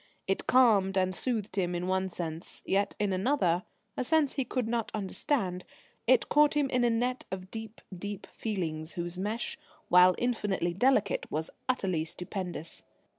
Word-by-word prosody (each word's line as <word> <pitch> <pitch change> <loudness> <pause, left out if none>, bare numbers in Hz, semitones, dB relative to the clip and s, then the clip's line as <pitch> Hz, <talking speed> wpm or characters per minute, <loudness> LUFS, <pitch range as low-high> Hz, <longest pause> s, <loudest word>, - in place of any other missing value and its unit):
It 195 - -1
calmed 205 -7 +5
and 185 0 +2
soothed 220 -2 -2
him 180 -2 +1
in 175 +1 -2
one 190 0 0
sense, 165 -1 -6
yet 200 +1 +1
in 205 -2 0
another, 185 -4 +1 0.3
a - - -1
sense 305 +1 +2
he 270 - 0
could 250 -2 -2
not 230 -1 -1
understand, 190 -2 -1 0.4
it - - +5
caught 295 0 +4
him 285 -2 +1
in 250 -1 +2
a 240 - +4
net 245 +2 0
of 185 0 -6
deep, 225 -1 -7
deep 205 +2 -6
feelings 165 -7 -3
whose 175 0 -4
mesh, 210 +10 -3 0.3
while 180 0 +7
infinitely 205 -8 0
delicate, 210 -1 +2
was 160 +2 -3 0.2
utterly 185 -10 +1
stupendous. 180 0 -5
195 Hz, 160 wpm, -30 LUFS, 180-240 Hz, 0.4 s, while